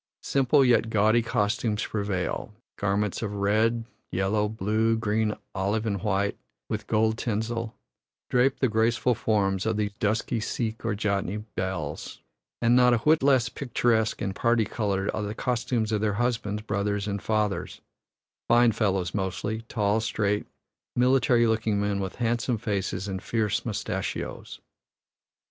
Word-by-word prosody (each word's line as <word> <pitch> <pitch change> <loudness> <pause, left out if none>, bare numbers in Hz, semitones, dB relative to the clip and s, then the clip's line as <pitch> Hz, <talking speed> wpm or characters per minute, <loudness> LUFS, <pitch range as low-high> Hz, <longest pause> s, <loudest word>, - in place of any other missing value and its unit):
Simple 135 +1 +3
yet 120 -2 +3
gaudy 110 +2 +3
costumes 105 -1 0
prevail 100 0 -3 0.2
garments 100 0 -1
of 105 -3 -3
red, 110 +3 +1 0.3
yellow, 105 +3 +1
blue, 110 +2 +1
green, 110 -1 0 0.2
olive, 100 +3 -1
and 100 -4 -1
white, 100 0 0 0.3
with - - -4
gold 110 +1 +2
tinsel, 115 0 -2 0.5
drape 130 +2 +2
the 130 - +4
graceful 115 +2 +2
forms 100 -4 0
of 110 -1 0
the 105 -1 0
dusky 110 +2 0
Sikh 110 0 -3
or 115 -2 0
Jatni 100 0 -1
belles; 90 -6 -4 0.4
and 120 +1 +5
not 125 -1 +6
a - - +2
whit 150 +7 +3
less 130 -3 +4
picturesque 115 -3 0
and 100 -2 -2
parti 115 -1 +2
colored 100 -2 -1
are - - -2
the 105 +1 -4
costumes 120 -2 -1
of 105 -1 0
their 105 -1 +1
husbands, 110 -2 -1
brothers, 105 -1 -1
and 100 -1 -2
fathers 105 -2 -1 0.7
fine 120 0 +5
fellows 95 -6 0
mostly, 100 +3 -2
tall, 105 -1 +1
straight, 105 -1 -1 0.5
military 125 -1 +4
looking 110 -2 +1
men, 100 -1 0
with 95 -1 -4
handsome 120 0 0
faces 100 -3 -2
and 95 -1 -4
fierce 110 -1 0
mustashios. 105 -3 -4
110 Hz, 140 wpm, -26 LUFS, 100-115 Hz, 0.7 s, not